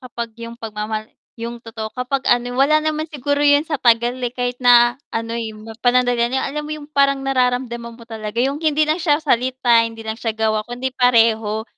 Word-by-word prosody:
kapag 235 -3 -6
yung 230 0 -8
pagmamahal 215 -1 -5 0.3
yung 235 +1 -5
totoo, 220 -1 -6
kapag 255 +2 -2
ano 245 0 +2
wala 305 +3 +4
naman 310 0 -1
siguro 285 -1 -2
yun 290 +1 +4
sa 300 -4 -3
tagal 235 0 +3
eh, 245 - -1
kahit 245 0 -3
na 240 0 +5
ano'y 225 -1 -4 0.3
panandalian 245 0 +2
alam 295 +3 -3
mo - - -3
yung 300 -1 -9
parang 275 -1 +2
nararamdaman 245 -3 -1
mo 235 - -14
talaga 220 -2 -7
yung 280 +3 -2
hindi 310 -1 +2
lang 310 +3 0
siya 310 -2 +2
salita, 250 -3 +3
hindi 225 -1 -4
lang 220 +1 -4
siya 225 -2 -2
gawa, 220 -1 +1
kundi 250 +2 -4
pareho. 225 -3 +2
245 Hz, 185 wpm, -20 LUFS, 230-275 Hz, 0.3 s, na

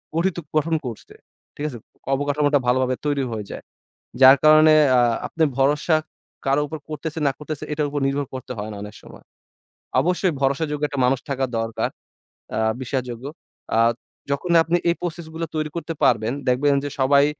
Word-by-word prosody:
গঠিত 175 +1 +1 0.2
গঠন 160 +2 +1
করছে। 115 -3 -8 0.4
ঠিক 145 - -4
আছে? 125 - -8 0.4
অবকাঠামোটা 145 +1 +2
ভালোভাবে 130 +1 +2
তৈরি 145 -2 +1
হয়ে 105 -2 -4
যায়। - - -7 0.6
যার 130 +1 +10
কারণে 155 0 +7 0.2
আ - - +6 0.3
আপনি 160 - +1
ভরসা 150 +4 +3 0.5
কারো 135 +2 +3
উপর 160 - -5
করতেছে 155 +1 -5
না - - 0
করতেছে 150 -1 -6
এটার 150 0 0
উপর 145 - -2
নির্ভর 140 0 -1
করতে 130 -1 -6
হয় 105 +1 -4
না 105 - -7
অনেক 105 +1 -8
সময়। - - -14 0.8
অবশ্যই 180 0 +1
ভরসাযোগ্য 145 +2 0
একটা 140 - -5
মানুষ 130 +1 +2
থাকা 135 -1 0
দরকার। 115 0 -2 0.7
আ 110 - 0 0.2
বিশ্বাসযোগ্য। 125 -1 -4 0.5
আ - - +4 0.5
যখন 170 +5 -1
আপনি 170 +2 +1
এই 170 - +2
প্রসেস 170 -1 -4
গুলো 165 +1 -3
তৈরি 155 0 -1
করতে 170 -1 -4
পারবেন, 110 +2 +3 0.2
দেখবেন 140 +3 +3
যে 145 - -3
সবাই 140 +2 +5
145 Hz, 165 wpm, -22 LUFS, 130-155 Hz, 0.8 s, যার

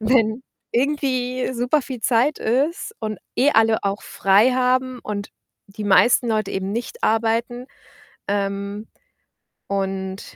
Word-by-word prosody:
wenn 225 +1 +2 0.3
irgendwie 255 -1 0
super 250 +5 +1
viel 255 -2 -7
Zeit 245 +6 +2
ist 290 - -1
und 215 -1 -4 0.2
eh 275 +4 +4
alle 225 0 +4
auch 200 +1 -1
frei 200 +6 +3
haben 255 0 +1
und 205 -1 -5 0.4
die 205 +1 -8
meisten 235 +4 +4
Leute 215 -1 0
eben 190 0 -2
nicht 240 - -5
arbeiten", 230 +3 0 0.6
ähm, 200 +1 -2 0.8
und 190 -1 -4
230 Hz, 120 wpm, -22 LUFS, 205-255 Hz, 0.8 s, eh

